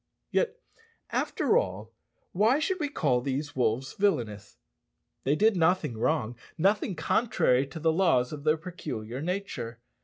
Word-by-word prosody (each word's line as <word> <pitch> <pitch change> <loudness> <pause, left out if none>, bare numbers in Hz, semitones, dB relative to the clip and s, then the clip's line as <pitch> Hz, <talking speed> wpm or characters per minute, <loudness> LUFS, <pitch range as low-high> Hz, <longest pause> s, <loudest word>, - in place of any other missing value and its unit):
Yet, 470 -2 +1 0.6
after 445 - +1
all, - - -5 0.4
why 220 +8 +3
should 370 +5 -1
we 295 -2 -1
call 135 - +1
these 140 +3 -3
wolves 125 +1 0
villanous? 110 - -1 0.7
They 140 +3 +3
did 215 +5 +4
nothing 175 -7 +2
wrong 120 0 0 0.2
nothing 195 +2 +2
contrary 160 - +2
to 140 +4 -8
the 160 0 +2
laws 160 -8 +2
of 145 -1 -7
their 155 +1 +3
peculiar 130 -8 -6
nature. 170 - -4
155 Hz, 140 wpm, -28 LUFS, 125-195 Hz, 0.7 s, did